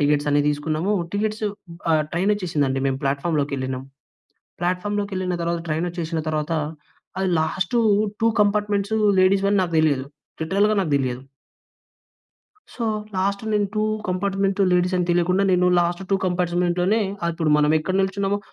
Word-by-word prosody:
టికెట్సన్నీ 145 0 +2
తీసుకున్నమూ. 155 +6 -1 0.2
Tickets 215 +1 -1 0.4
ఆహ్, 155 -1 +3
ట్రైనొచ్చేసిందండి. 170 -8 0
మేము 135 0 -1
ప్లాట్ఫామ్‌లోకెళ్ళినం. 140 -3 -1 0.8
ప్లాట్ఫామ్‌లోకెళ్ళిన 185 0 -1
తర్వాత 170 0 -1
ట్రైనొచ్చేషిన 165 0 -2
తర్వాత, 155 +1 -2 0.7
అది 190 -1 0
లాస్టూ 185 +9 0 0.4
2 230 - +5
కంపార్ట్మెంట్సూ 205 +1 0 0.2
లేడీస్‌వని 195 +1 +3
నాకు 170 -2 -3
దెలియదు. 140 -4 +2 0.4
లిటరల్‌గా 200 +6 +2
నాకు 155 -5 -3
దెలియదు. 130 -1 -2 1.5
సో, 235 - -5 0.3
లాస్ట్ 200 +2 0
నేను 205 -1 +1
2 215 - 0 0.3
కంపార్ట్మెంటు 195 +1 0
లేడీసని 180 0 +1
తెలియకుండా 180 +3 +2
నేను 180 0 +3
లాస్ట్ 175 +1 0
2 - - +5
కంపాట్స్‌మెంట్‌లోనే 180 +3 +1 0.2
ఆహ్, 170 - +1
ఇప్పుడు 160 -2 0
మనం 150 0 +3
ఎక్కడ 185 +4 -2
నిల్చున్నామో 195 +1 -1
180 Hz, 120 wpm, -22 LUFS, 155-200 Hz, 1.5 s, 2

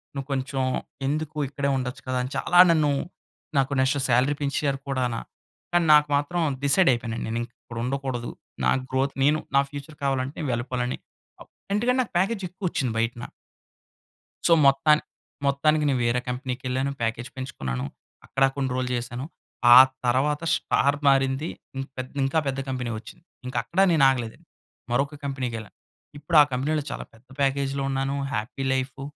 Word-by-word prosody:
నువ్వు 135 -1 -4
కొంచెం 135 0 -2 0.5
ఎందుకు 155 +1 -2
ఇక్కడే 140 +1 -2
ఉండొచ్చు 125 -1 -4
కదా!" 130 0 -1
అని 130 - -5
చాలా 175 - +3
నన్ను 155 -3 +3 0.7
నాకు 135 +1 +2
నెక్స్ట్ 130 +2 +2
సాలరీ 130 +4 +3
పెంచారు 140 -1 0
కూడాన 125 -3 -1 0.6
కానీ, 175 -1 +3
నాకు 150 0 +6
మాత్రం 145 +5 -2 0.2
డిసైడ్ 145 +5 +4
అయిపోయాను 115 -1 -3
నేను 115 +1 -2
ఇక్కడ 120 0 -13
ఉండకూడదు. 130 -2 -3 0.3
నా - - +4 0.2
గ్రోత్, 135 +1 0
నేను 150 +2 +4 0.2
నా 140 - +7
ఫ్యూచర్ 145 +1 -9
కావాలంటే, 135 0 -1
వెళ్ళిపోవాలని 125 +1 -2 0.4
అప్ - - -14 0.2
ఎందుకంటే 250 +5 +2
నాకు - - -13
ప్యాకేజ్ 195 +2 0
ఎక్కువొచ్చింది 170 - -2
బయటన. 115 +1 -2 1.2
సో, - - +5
మొత్తాని 150 +3 +4 0.4
మొత్తానికి 150 +2 +2
నేను 135 -3 +1
వేరే 120 +1 +2
కంపెనీకెళ్ళాను, 130 +1 -2
ప్యాకేజ్ 115 +1 -2
పెంచుకున్నాను. 65 - -4 0.4
అక్కడ 135 +1 +1
కొన్ని 135 -2 -1
రోజులు 130 -1 -1
చేశాను. 120 +2 -4 0.5
ఆ - - +10 0.3
తరువాత 145 +5 +1
స్టార్ 140 +1 +1
మారింది. 135 +3 +2 0.3
ఇన్ 135 - -2 0.4
ఇంకా 135 +4 +1
పెద్ద 135 0 -1
కంపెనీ 125 -2 -3
వచ్చింది. 110 +7 -13 0.2
ఇంక 125 - -6
అక్కడా 190 +3 +1
నేను 150 -4 +5
ఆగలేదు. 120 -4 -1 0.5
మరొక 140 +4 0
కంపెనీకెళ్ళా. 125 -6 -4 0.5
ఇప్పుడు 150 +3 -1
ఆ - - +4
కంపెనీలో 145 +4 0
చాలా - - -5
పెద్ద 115 +3 -22
ప్యాకేజ్‌‌లో 140 0 0
ఉన్నాను, 135 +1 -1 0.2
హ్యాపీ 115 +5 -3
లైఫు 130 0 -2
135 Hz, 145 wpm, -25 LUFS, 125-145 Hz, 1.2 s, ఆ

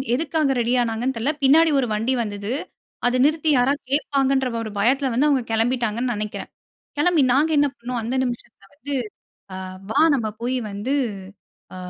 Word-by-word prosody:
எதுக்காக 300 -1 0
ரெடி 240 +1 +1
ஆனாங்கன்னு 240 +3 -1
தெரியல. 265 +7 0
பின்னாடி 315 +4 +6
ஒரு 250 - 0
வண்டி 230 +5 0
வந்தது. 205 0 -5 0.6
அத 250 +1 +1
நிறுத்தி 310 +1 +1
யாராவது 270 +4 +2
கேட்பாங்கன்ற 275 -2 +1 0.2
ஒரு 215 - -6
பயத்தில 265 +5 +2
வந்து 280 +5 +3
அவுங்க 275 -4 +2
கிளம்பிட்டாங்கன்னு 235 +1 0
நினைக்கிறேன். 210 0 -5 0.5
கிளம்பி 330 0 +3
நாங்க 295 +5 +3
என்ன 290 0 +4
பண்ணோம்? 240 0 -4
அந்த 235 +4 -3
நிமிஷத்தில 240 -4 -6
வந்து 275 +8 -6 0.6
ஆ - - -5 0.3
வா! 220 - +2
நம்ம 230 -5 -1
போய் 255 +2 -1
வந்து 210 +8 -2 0.8
ஆ - - -8
255 Hz, 155 wpm, -22 LUFS, 230-280 Hz, 0.8 s, பின்னாடி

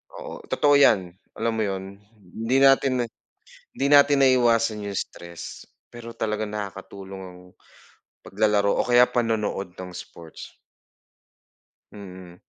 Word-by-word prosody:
Oo - - -8
totoo 145 -1 +3
yan, 100 -10 +4 0.2
alam 115 0 -1
mo 110 - +1
yun? 95 0 -6 0.2
Hindi 110 +5 -3
natin 135 0 +5
na - - -3 0.7
hindi 135 - -1
natin 145 0 +6
naiwasan 115 -4 +3
yung 100 - -5
stress 85 -1 -8 0.3
pero 120 -1 -10
talaga 110 -2 -2
nakakatulong 100 -2 -7
ang 90 -1 -11 0.8
paglalaro 100 0 +1
o - - +3
kaya 120 0 +6
panonood 110 -6 -2
ng 90 -1 -8
sports. 85 -2 -11 1.4
Mm. 95 -3 -11
105 Hz, 120 wpm, -24 LUFS, 95-120 Hz, 1.4 s, natin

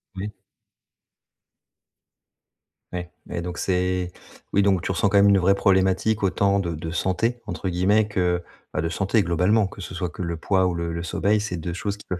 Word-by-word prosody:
Oui. 100 +2 -4 2.6
Ouais, 90 -1 -5 0.2
ouais, 85 - -4
donc 90 0 -5
c'est 90 -1 0 0.4
oui, 100 - +3
donc 95 -4 +3
tu 95 - -2
ressens, 95 +3 +2
quand 100 - +3
même, 100 0 +6
une 100 - +6
vraie 95 +1 +4
problématique 95 +2 +2
autant 100 +1 +2
de 85 -3 -2
de 80 +1 -5
«santé» 95 +8 0
entre 90 +2 -3
guillemets 100 +5 +3
que, 90 -3 0 0.3
bah, 75 - 0
de 80 - -1
santé, 100 +4 +1
globalement. 95 +5 +2
Que 100 - -12
ce 95 - -7
soit 90 -1 -2
que 90 - -6
le 85 -1 -3
poids 95 +2 +2
ou 90 - +1
le 85 0 -3
le 85 0 -4
sommeil, 105 +4 +1
c'est 95 -4 -3
2 85 +1 -4
choses 100 +3 -3
qui 105 - -15
peuvent 90 -1 -3
95 Hz, 195 wpm, -24 LUFS, 90-100 Hz, 2.6 s, même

